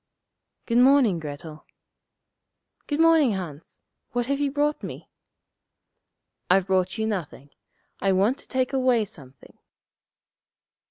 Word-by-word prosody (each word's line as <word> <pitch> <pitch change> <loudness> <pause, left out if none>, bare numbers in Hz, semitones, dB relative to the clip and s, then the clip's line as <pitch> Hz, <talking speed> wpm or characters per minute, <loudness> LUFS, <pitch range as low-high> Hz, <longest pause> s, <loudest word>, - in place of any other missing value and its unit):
] - - -55
'Good 235 0 +2
morning, 250 -8 +5
Grettel.' 150 +1 -8 1.2
'Good 290 0 -2
morning, 325 -7 +5
Hans. 165 -6 -8 0.3
What 245 0 0
have 280 +2 -1
you 285 -1 +1
brought 295 +2 0
me?' - - -8 1.4
'I've 185 0 +4
brought 190 +1 0
you 220 - -1
nothing. 170 -9 -5 0.5
I 195 - +1
want 200 +8 +2
to - - -12
take 260 0 -1
away 255 -4 +2
something.' 140 - -15
220 Hz, 120 wpm, -25 LUFS, 180-270 Hz, 1.4 s, morning